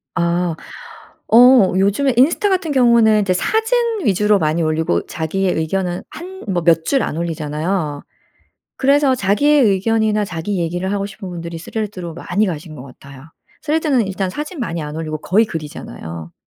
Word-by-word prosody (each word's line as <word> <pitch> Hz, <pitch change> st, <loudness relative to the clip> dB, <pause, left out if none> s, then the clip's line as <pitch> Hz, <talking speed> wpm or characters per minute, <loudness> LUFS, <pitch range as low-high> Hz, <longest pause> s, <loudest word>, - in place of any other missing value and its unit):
아. 170 Hz, -1 st, 0 dB, 0.8 s
어 240 Hz, -4 st, +6 dB
요즘에 205 Hz, +8 st, +2 dB
인스타 330 Hz, +10 st, +3 dB
같은 370 Hz, -5 st, 0 dB
경우는 235 Hz, -5 st, +4 dB
이제 195 Hz, -3 st, +1 dB
사진 450 Hz, -, 0 dB
위주로 210 Hz, -1 st, +2 dB
많이 160 Hz, 0 st, 0 dB
올리고 160 Hz, +2 st, 0 dB
자기의 180 Hz, +4 st, -2 dB
의견은 175 Hz, +2 st, -2 dB
한 350 Hz, +3 st, -9 dB, 0.2 s
뭐 175 Hz, -3 st, 0 dB
몇 165 Hz, -1 st, +3 dB
줄 275 Hz, -2 st, +2 dB
안 150 Hz, -, -3 dB
올리잖아요. 155 Hz, -1 st, -3 dB, 0.8 s
그래서 280 Hz, 0 st, +3 dB
자기의 270 Hz, +8 st, +3 dB
의견이나 215 Hz, 0 st, +1 dB
자기 185 Hz, +2 st, -4 dB
얘기를 175 Hz, +3 st, -2 dB
하고 200 Hz, -1 st, -1 dB
싶은 200 Hz, -1 st, -9 dB
분들이 170 Hz, -1 st, -6 dB
스레드로 185 Hz, -2 st, -5 dB
많이 185 Hz, +5 st, -1 dB
가신 160 Hz, -2 st, -6 dB
것 125 Hz, -, -9 dB
같아요. 135 Hz, 0 st, -14 dB, 0.4 s
스레드는 300 Hz, -7 st, +1 dB
일단 190 Hz, -1 st, -2 dB
사진 300 Hz, -, -6 dB
많이 170 Hz, -9 st, -3 dB
안 150 Hz, 0 st, -6 dB
올리고 155 Hz, -1 st, -4 dB
거의 205 Hz, +8 st, +2 dB
글이잖아요. 85 Hz, -, -8 dB
190 Hz, 350 characters per minute, -18 LUFS, 165-235 Hz, 0.8 s, 어